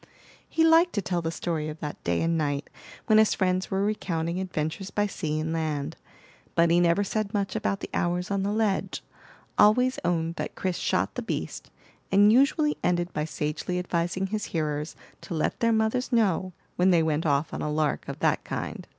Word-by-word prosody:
He 325 - +2
liked 330 +2 +5
to 205 - 0
tell 175 -1 -1
the 165 - -2
story 165 -2 -2
of 155 +1 -8
that 150 -1 -6
day 85 0 0
and 165 0 +1
night 145 -3 -1 0.3
when 215 -1 +5
his 220 - +4
friends 185 -1 0
were 195 +1 0
recounting 170 -5 -2
adventures 185 +1 -3
by 205 +1 0
sea 155 -6 -2
and 160 +1 -2
land; 155 -3 -2 0.6
but 170 0 +4
he 170 - +5
never 175 +3 +3
said 215 +1 -2
much 195 -1 -1
about 200 -2 -1
the - - -5
hours 175 +2 -1
on 200 -1 +1
the 200 +1 0
ledge, 215 -2 -1 0.6
always 250 +5 +5
owned 170 -1 0
that - - -4
Chris 185 -2 -2
shot - - 0
the - - -4
beast, - - -4 0.4
and 205 +2 +6
usually 290 +4 +3
ended 175 0 0
by 150 - -1
sagely 155 +3 -3
advising 180 +1 -1
his 210 +2 -3
hearers 150 -1 -2 0.3
to 175 - -6
let 155 - -1
their 230 0 +3
mothers 220 +4 +1
know, 195 -6 +2 0.3
when 180 +1 +4
they 170 -3 +4
went 160 0 0
off 145 +1 +1
on - - -4
a 150 - -2
lark 150 -1 0
of - - -5
that - - +2
kind. - - -5
180 Hz, 195 wpm, -27 LUFS, 160-205 Hz, 0.6 s, and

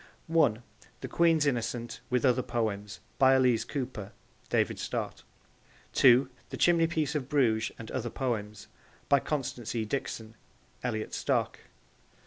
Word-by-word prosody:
(1) 145 -9 +2 0.4
The - - -4
Queen's 165 -3 +3
Innocent, 120 -3 -2
with 125 +1 +1
Other 130 0 +4
Poems. 110 -4 -3 0.2
By 130 0 +6
Elise 125 -4 +3
Cooper. 120 -7 -5 0.4
(David - - +1
Stott.) - - -4 0.7
(2) 130 0 +6 0.2
The - - -6
Chimneypiece 165 -3 +2
of 140 -4 -3
Bruges 115 -7 +2
and 115 - -9
Other 120 -2 -2
Poems. 110 -5 -3 0.4
By 140 - +6
Constance 125 -6 -3
E. 110 -2 0
Dixon. 110 -2 -4 0.5
(Elliot 110 -3 -3
Stock.) - - 0
125 Hz, 125 wpm, -29 LUFS, 110-140 Hz, 0.7 s, By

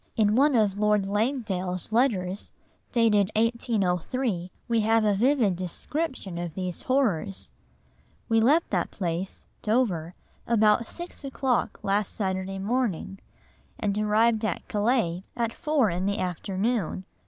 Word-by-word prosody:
In 210 -2 +3
one 280 +2 +4
of 205 -3 +2
Lord 210 -1 +3
Langdale's 200 - -1
letters, 205 -6 +1 0.4
dated 210 -4 +3
1803, 220 -2 0 0.2
we 230 -2 +2
have 225 +1 +3
a 210 - +3
vivid 230 -2 +2
description 190 - -3
of 170 -2 -5
these 185 -2 -4
horrors: 215 - 0 0.8
"We 225 0 +3
left 295 +9 +3
that 180 -4 0
place 180 0 -4 0.2
[Dover] 195 -8 0 0.3
about 220 0 +3
six 345 -3 -7
o'clock 265 -2 -1
last 200 0 0
Saturday 190 -1 -2
morning, 200 -3 -1 0.6
and 200 -1 0
arrived 215 +2 +2
at 210 -6 -2
Calais 205 -5 +1
at 230 -1 0
four 290 - +1
in 180 +3 -1
the 200 - 0
afternoon. 190 +2 -2
210 Hz, 125 wpm, -26 LUFS, 190-235 Hz, 0.8 s, one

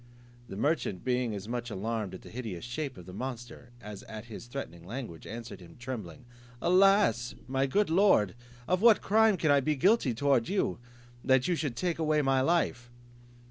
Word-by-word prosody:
The - - -6
merchant 140 - -1
being 125 -3 0
as 100 +1 -7
much 120 0 -3
alarmed 105 -1 -3
at - - -11
the - - -12
hideous 110 -7 -6
shape 130 +1 -4
of 90 - -11
the 90 - -10
monster 120 +1 -7
as 105 -2 -9
at 110 0 -7
his 115 +1 -9
threatening 105 -10 -7
language, 105 -4 -7
answered 115 -4 -7
him, 85 -2 -14
trembling, 120 -6 -7 0.3
"Alas! 190 - +3
my 135 +1 0
good 200 +6 +1
lord, 170 - +4 0.3
of 185 +1 +1
what 230 -2 +6
crime 220 -1 +4
can 155 -3 +2
I 140 - +5
be 150 +3 0
guilty 160 - +3
towards 135 -2 +2
you, 190 - 0 0.4
that 130 -1 +3
you 180 - +2
should 145 -7 -2
take 170 +5 -2
away 155 -2 +2
my 135 -1 +2
life?" 130 -6 0
125 Hz, 180 wpm, -30 LUFS, 110-155 Hz, 0.4 s, what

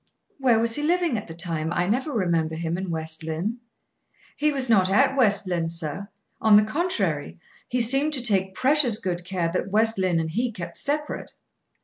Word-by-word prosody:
"Where 250 -4 +4
was 230 0 +1
he 295 - -1
living 340 -2 +1
at - - -11
the 165 - -9
time? 165 -2 -2
I 175 +1 0
never 255 - -1
remember 170 - 0
him 165 +1 -2
in 190 0 -4
West 160 -1 -3
Lynne." 170 +9 -3 0.8
"He 300 +1 +1
was 270 -3 0
not 195 -5 +4
at 265 +9 +3
West 210 -6 +3
Lynne, 170 -3 -1
sir. 165 +4 -1 0.3
On 220 -1 +6
the 210 - +5
contrary, 195 - -2 0.3
he 250 0 0
seemed 270 +6 +1
to 255 - -1
take 190 -4 +1
precious 260 -3 +3
good 180 -4 -3
care 175 -2 -2
that 185 - -2
West 220 +1 +2
Lynne 185 -3 +1
and 160 -1 -2
he 235 +7 -1
kept 180 -6 -6
separate. 295 +1 -3
200 Hz, 195 wpm, -24 LUFS, 170-250 Hz, 0.8 s, On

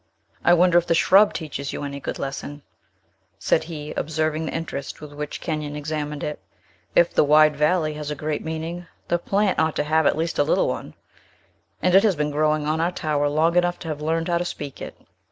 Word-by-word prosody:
"I 175 - +6
wonder 175 0 +5
if 175 - -7
the 165 - +3
shrub 195 +5 +5
teaches 140 -3 -5
you - - -5
any 140 0 -5
good - - -5
lesson," 140 +1 -6 0.7
said - - +1
he, 150 -3 -7
observing 155 0 -1
the - - -3
interest 165 -4 -5
with 150 -1 -10
which 150 0 -5
Kenyon 150 -2 -3
examined 150 -1 -4
it. 150 - -4 0.6
"If 170 - +4
the - - +4
wide 150 +1 +5
valley 155 +1 +1
has 150 -1 -6
a 150 - -3
great 150 +1 -3
meaning, 165 +2 -5 0.2
the 175 - +2
plant 200 +2 +1
ought 160 -1 +1
to - - 0
have 155 0 +2
at - - +2
least 165 +1 -2
a - - +6
little 150 - +2
one; - - -5 0.9
and 180 - +3
it 195 - +8
has 210 -4 +2
been 150 0 -1
growing 155 0 +1
on 155 +2 0
our 170 +2 +1
tower 150 -4 0
long 160 +3 +2
enough 175 0 +2
to 165 - -8
have 150 -1 -4
learned 165 +2 -1
how 170 -1 +1
to - - 0
speak 145 -5 -6
it." - - -8
155 Hz, 215 wpm, -23 LUFS, 150-170 Hz, 0.9 s, it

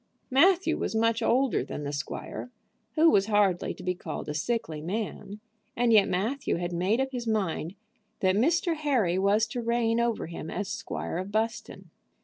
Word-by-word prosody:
Matthew 355 +8 +4
was - - -2
much 230 +1 +2
older 255 +3 +2
than 150 - -6
the 145 0 -4
squire, 145 - -5 0.5
who 325 +1 +6
was 195 0 +3
hardly 205 -4 +2
to - - -11
be 180 0 0
called 170 -3 -6
a - - -2
sickly 155 -2 -2
man, 205 +3 -4 0.4
and 240 -1 +3
yet 210 -2 +6
Matthew 225 +10 -1
had 175 +1 -3
made 185 +7 +1
up 265 0 0
his 245 -3 -4
mind 195 -5 -1 0.4
that 185 0 +2
Mr. 330 - +2
Harry 250 - +1
was 205 +3 +3
to 240 +2 -3
reign 235 0 +1
over 235 -1 0
him 160 -1 -7
as 205 +3 -3
Squire 225 -5 -4
of 190 +2 -5
Buston. 225 +2 -3
220 Hz, 175 wpm, -28 LUFS, 185-240 Hz, 0.5 s, who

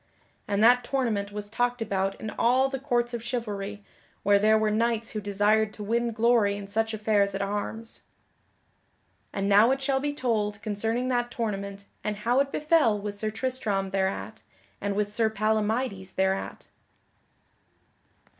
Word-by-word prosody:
And 200 +1 +1
that 245 +2 +6
tournament 230 -6 -1
was 205 0 -5
talked 245 +3 -1
about 195 -3 -1
in 215 - -5
all 255 +3 +3
the 270 0 -4
courts 240 -3 0
of 235 -1 -4
chivalry 210 -4 -4 0.4
where 200 0 +5
there 215 +1 +4
were 215 -1 +1
knights 230 +1 0
who 215 - -4
desired 210 +2 +2
to 210 - -7
win 235 +3 0
glory 225 -2 +3
in 205 - -7
such 220 +3 -1
affairs 205 -2 +1
at 195 - -2
arms. 210 +3 -4 1.3
And 195 0 -2
now 205 +3 +6
it 270 +1 +1
shall 270 0 0
be 290 +1 -2
told 215 -6 -1
concerning 225 +4 -1
that 240 -1 0
tournament 200 -4 -4 0.2
and 210 0 -1
how 235 +5 +1
it 275 0 +1
befell 300 -8 +3
with 205 0 -5
Sir 215 - -1
Tristram 215 -5 -2
thereat, 190 0 -2 0.4
and 200 0 -1
with 205 0 -1
Sir 225 0 +2
Palamydes 215 -1 -1
thereat. 190 0 -1
215 Hz, 155 wpm, -27 LUFS, 205-240 Hz, 1.3 s, that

